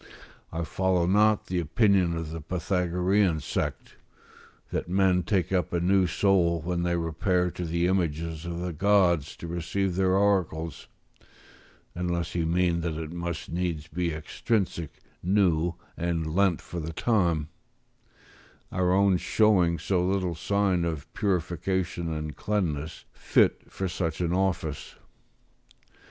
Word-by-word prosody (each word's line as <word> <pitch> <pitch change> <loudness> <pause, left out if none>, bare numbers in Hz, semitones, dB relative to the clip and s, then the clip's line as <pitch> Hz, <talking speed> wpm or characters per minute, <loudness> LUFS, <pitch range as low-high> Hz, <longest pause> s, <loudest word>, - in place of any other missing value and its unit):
I 80 +1 -3
follow 90 +2 +1
not 105 +3 +3
the 90 -1 -1
opinion 90 0 +2
of 80 -1 -5
the 80 0 -5
Pythagorean 90 +1 +1
sect, - - -4 0.7
"that - - -3
men 95 -1 +3
take 90 0 0
up 90 -4 0
a 85 - 0
new 95 +1 +3
soul 85 -2 +2
when 85 +2 -2
they 85 0 0
repair 90 +2 0
to 90 - -5
the 85 +1 0
images 85 -3 -1
of 85 -1 -4
the 90 -1 -3
gods 90 -4 +2
to - - -9
receive 85 +2 -2
their 95 0 +2
oracles," 90 -5 0 1.1
unless 85 -1 -2
he 85 -2 0
mean 85 0 +1
that 85 -2 -2
it 80 -1 -5
must 85 -1 -5
needs 85 -3 -2
be 85 +1 -2
extrinsic, 85 - -2 0.2
new, 90 -3 +2 0.2
and 85 -2 -2
lent 95 -2 +2
for 85 - -6
the 80 0 -5
time; 85 -8 +1 1.2
our 90 -1 +1
own 95 0 +4
showing 90 -4 +3
so 90 -1 0
little 95 -1 0
sign 95 +1 +1
of 80 -4 -4
purification 90 -2 -1
and 75 -1 -4
cleanness, 85 -7 -2
fit - - +1
for 95 - -3
such 85 -2 -3
an 85 -1 0
office. 90 -6 -1
85 Hz, 135 wpm, -27 LUFS, 85-95 Hz, 1.2 s, own